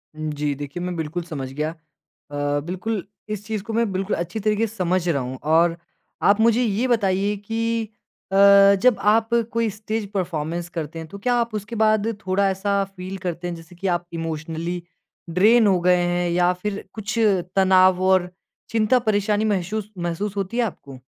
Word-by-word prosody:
जी। 150 -2 -2
देखिए 145 +5 -6
मैं 180 -1 -3
बिल्कुल 165 +2 -3
समझ 140 -6 -6
गया। 155 +2 -2
अ, 145 -2 -5
बिल्कुल 185 +3 -3 0.3
इस 210 -1 -4
चीज़ 215 -2 -3
को 225 - -6
मैं 230 -2 +1
बिल्कुल 190 +2 -1
अच्छी 175 +6 -4
तरीके 215 +2 +1
से 220 - -12
समझ 180 -2 0
रहा 140 -5 +1
हूँ 130 +1 -5
और 165 +2 +3 0.4
आप 200 +2 +4
मुझे 230 +2 +4
ये 230 +3 0
बताइए 200 -3 +1
कि 225 +1 -2 0.4
अ, - - -1 0.5
जब 250 -2 +5
आप 225 +1 +3 0.2
कोई 230 -1 +1
स्टेज़ 215 +1 -4
परफ़ॉर्मेंस 170 -2 -2
करते 165 -1 -5
हैं 160 - -7
तो 200 - -8
क्या 245 +4 +1
आप 235 -2 0
उसके 210 +3 -5
बाद 215 -1 +3 0.2
थोड़ा 190 +1 +2
ऐसा 200 +1 0
फ़ील 190 0 -8
करते 175 0 -3
हैं 175 - -4
जैसे 165 +1 -13
कि 195 +3 -4
आप 175 0 -5
इमोशनली 165 +1 -4 0.5
ड्रेन 215 +6 +5
हो 190 -2 +3
गए 180 0 +4
हैं? 175 0 0
या 175 +1 +3
फिर 200 +3 -4
कुछ 220 +1 -5 0.4
तनाव 185 -1 +5
और 185 -1 +3 0.4
चिंता 225 +2 +3
परेशानी 210 -1 +1
महशुस 210 +1 -1
महसूस 175 +4 -3
होती 195 +4 -2
है 245 - +3
आपको? 140 - -6
190 Hz, 180 wpm, -23 LUFS, 170-215 Hz, 0.5 s, जब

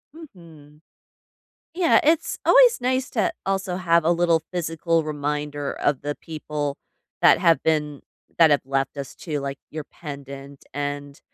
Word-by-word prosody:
Mhm. 165 - -15 0.9
Yeah, 350 -2 +4
it's 315 +2 +2
always - - +6
nice 255 +1 0
to 215 -5 0
also 195 -2 -1
have 170 -3 +2
a 165 - +3
little 170 -1 +2
physical 165 -1 0
reminder 145 -1 -3
of 145 -3 -1
the 145 +1 -3
people 150 -3 -5 0.4
that - - +6
have 165 -1 +3
been 150 -3 0 0.4
that 165 -2 +7
have 145 -1 +2
left 135 +1 -2
us 140 -1 -6
too, 155 -4 -4
like 140 0 -5
your 155 -1 -6
pendant, 140 -2 -10
and 145 0 -5
155 Hz, 145 wpm, -23 LUFS, 145-175 Hz, 0.9 s, that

